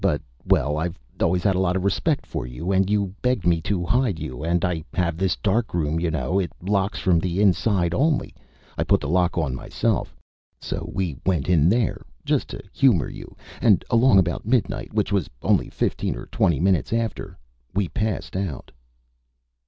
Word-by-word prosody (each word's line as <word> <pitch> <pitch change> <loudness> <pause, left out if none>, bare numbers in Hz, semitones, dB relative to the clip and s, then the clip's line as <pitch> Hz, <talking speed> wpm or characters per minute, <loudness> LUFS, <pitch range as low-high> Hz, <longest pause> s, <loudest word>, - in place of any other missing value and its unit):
But 85 -7 +2 0.3
well, 75 +1 +2
I've 85 +2 -3 0.2
always 90 +1 +2
had 100 - +3
a - - +1
lot 90 -1 +1
of 95 - -1
respect 135 - 0
for - - -5
you. 80 +10 -4
And 95 0 +2
you 100 -3 0
begged 125 -6 0
me 85 -2 +3
to 90 0 -1
hide 120 -2 +1
you 75 -2 -6
and 85 +2 +1
I 85 -3 -2
have 85 -3 0
this 95 +1 0
darkroom, 90 -7 0
you 85 0 0
know. 80 +4 0
It 90 - -2
locks 100 +2 0
from 90 -3 +2
the 90 +2 -2
inside 95 -3 +2
only. 150 - +1 0.5
I - - +3
put - - +3
the 75 - -5
lock 90 +3 +1
on 75 -6 0
myself. 65 - -2 0.4
So - - -5
we 90 -8 -2
went 85 -6 0
in 85 -3 +4
there 115 +1 +1 0.2
just - - +1
to - - -7
humor 120 - +3
you - - -11 0.2
and 105 -7 +4
along 115 -2 +5
about 85 -3 +1
midnight, 110 -3 0
which 105 -2 0
was 100 -6 0
only - - +2
fifteen - - -1
or - - -7
twenty 85 -6 +1
minutes 95 0 +1
after, 110 -5 -2 0.4
we 100 -2 +1
passed 105 +1 -3
out." 95 -8 -4
95 Hz, 185 wpm, -23 LUFS, 85-100 Hz, 0.5 s, along